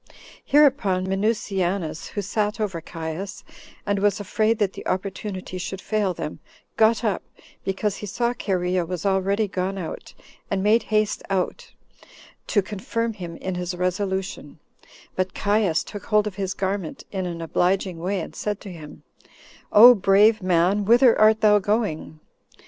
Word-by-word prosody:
Hereupon 265 -11 +3
Minucianus, 195 -4 -1
who 205 - -4
sat 210 +2 -1
over 190 -6 -2
Caius, 165 +4 -6 0.4
and 205 -1 0
was 205 0 +2
afraid 215 +3 +1
that 205 -3 0
the - - -8
opportunity 190 -1 -4
should 190 +1 -5
fail 210 -2 0
them, 150 -1 -5 0.4
got 225 +2 +3
up, 210 -4 0 0.4
because 195 +1 -1
he 210 - -7
saw 235 +4 -1
Cherea 185 -5 -1
was 180 +1 -5
already 195 +2 +1
gone 190 0 -3
out, 175 -4 -7 0.3
and 195 -1 -1
made 220 +3 +4
haste 215 -1 +1
out, 190 -2 -2 0.8
to 205 - +2
confirm 225 +4 -3
him 175 -5 -7
in 190 +2 -4
his 180 0 -3
resolution; 190 +2 -3 0.6
but 185 0 -2
Caius 205 -5 +1
took 205 - -9
hold 210 -1 +3
of 210 - -3
his 190 0 -3
garment, 190 -3 -3
in 190 -2 -3
an 170 -1 -5
obliging 180 +2 0
way, 185 +2 -1
and - - -8
said 210 -1 -3
to 200 - -8
him, 155 -4 -11 0.7
"O 240 +4 +10
brave 205 +1 +4
man! 185 +3 +2
whither 235 +3 +5
art 215 0 +5
thou 210 -1 +5
going?" 205 -7 -2
195 Hz, 150 wpm, -23 LUFS, 185-210 Hz, 0.8 s, O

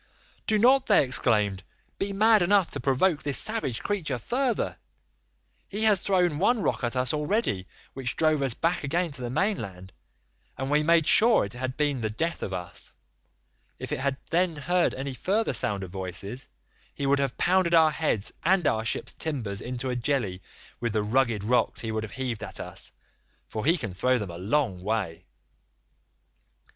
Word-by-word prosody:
"'Do 215 - +3
not,' 260 +5 +4
they - - +5
exclaimed, 105 -6 +1 0.4
'be 200 +1 -1
mad 215 +2 +4
enough 190 0 +3
to - - -4
provoke 145 +5 +2
this 140 -2 +2
savage 215 - -1
creature 165 -11 -2
further; 245 - -1 0.9
he 205 +2 -3
has 210 -3 +5
thrown 180 -6 +1
one 235 +5 +3
rock 145 - -1
at 120 +1 -1
us 125 +1 0
already 150 - -1 0.3
which 130 -2 -3
drove 155 -2 +2
us 135 -4 0
back 165 0 0
again 165 +4 0
to 135 -2 -5
the 120 - -3
mainland, 105 - -2 0.6
and 135 +1 -3
we 150 +1 +4
made 165 0 +4
sure 225 - +5
it 100 - -8
had 130 +1 -4
been 145 -4 0
the 110 - -1
death 165 +10 -2
of - - -4
us; 90 -2 -6 0.8
if - - -7
he - - 0
had 135 +1 -1
then 175 0 +2
heard 175 +4 +1
any 135 +1 -4
further 200 - 0
sound 100 -2 0
of 90 - -8
voices 95 +6 -6 0.5
he 140 - -3
would 140 +1 +3
have 140 -2 -1
pounded 180 -1 +3
our 160 -1 +6
heads 150 -10 -1
and 180 0 +3
our 110 -5 +1
ship's 115 - -2
timbers 115 -11 -3
into 125 +1 -4
a - - -2
jelly 115 -7 -1 0.4
with 120 -3 -2
the 105 -1 +1
rugged 115 -2 +1
rocks 125 +4 +1
he 115 - -3
would 110 0 -1
have 110 - -7
heaved 125 -5 -4
at - - -6
us, - - -6 0.5
for 110 +1 -5
he 170 +3 +4
can 105 - -5
throw 125 +8 +2
them 105 -6 -4
a 85 - -8
long 100 -2 0
way. 95 -4 -3
135 Hz, 180 wpm, -27 LUFS, 110-175 Hz, 0.9 s, our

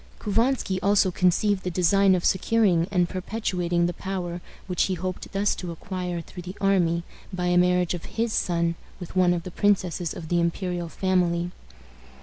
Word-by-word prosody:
Couvansky 225 -2 0
also 200 -2 +3
conceived 185 +3 +2
the 185 - -3
design 190 +2 +4
of 175 - -2
securing 190 -4 +3
and 180 -3 +2
perpetuating 180 -3 -1
the 175 - -1
power 180 -2 -4 0.2
which 180 -2 +1
he 190 - -1
hoped 185 +1 -5
thus 200 +1 +1
to 180 - -6
acquire 180 0 -4
through 180 +2 -10
the 185 +3 -8
army 175 -4 +2 0.3
by 180 -1 -3
a 175 0 +2
marriage 180 0 +3
of 175 - -6
his 230 0 -2
son 170 -1 +1 0.3
with 180 -1 -9
one 180 -1 +4
of 175 -1 -1
the 185 - -7
princesses 180 -4 0
of 160 -2 -8
the 175 - +2
imperial 175 0 -2
family. 175 -1 0
180 Hz, 170 wpm, -25 LUFS, 175-195 Hz, 0.3 s, design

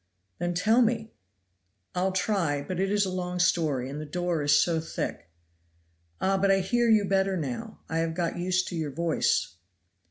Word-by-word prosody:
"Then 175 0 -1
tell 220 +7 +4
me." 225 -1 0 0.8
"I'll 185 +1 0
try; 185 -7 0
but 185 +3 -4
it 195 0 +1
is 205 -1 +2
a 190 - -3
long 180 -1 -3
story, 160 -8 +1
and 145 +3 -5
the - - -5
door 175 +1 -1
is 145 0 +4
so 165 -2 +2
thick." 160 - -5 0.9
"Ah! 195 0 +1
but 195 +1 +2
I 195 - +5
hear 240 +5 +1
you 215 -2 +5
better 195 0 +1
now. 165 - -5
I 160 - -1
have 165 0 -1
got 170 -1 -1
used 185 +1 0
to 180 - -5
your 160 -3 -2
voice. 160 - 0
180 Hz, 185 wpm, -27 LUFS, 160-195 Hz, 0.9 s, I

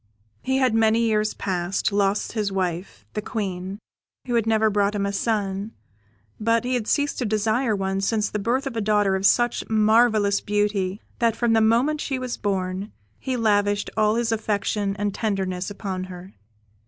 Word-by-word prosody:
He 265 0 0
had, 260 -4 +2
many 225 0 +3
years 215 -2 +1
past, 185 +2 -1
lost 200 0 +1
his 210 -3 -1
wife, 185 -1 -3
the 210 - -2
Queen, 190 -3 -4 0.5
who 245 - -3
had 230 -2 +1
never 220 -1 +3
brought 205 0 +1
him 200 -1 0
a 200 - -2
son; 200 -1 -1 0.7
but 230 +1 +2
he 255 - -1
had 235 -4 -1
ceased 290 -1 0
to 250 - -1
desire 220 +2 +1
one 195 0 -1
since 210 +1 +1
the 210 - -3
birth 240 +7 0
of 270 -3 -4
a 225 - -1
daughter 205 -2 +2
of 190 +1 +3
such 240 -1 +2
marvellous 215 -1 +3
beauty, 205 -1 -1 0.2
that 230 -2 +2
from 235 -1 +1
the 225 - +4
moment 245 +8 +2
she 270 - -2
was 255 -1 -3
born 190 0 -2 0.3
he 260 -1 -2
lavished 205 -2 +1
all 215 0 +3
his 235 -1 0
affection 205 -2 -1
and 205 0 -1
tenderness 190 -4 -2
upon 195 -2 -4
her. 185 +1 -10
210 Hz, 180 wpm, -24 LUFS, 195-225 Hz, 0.7 s, the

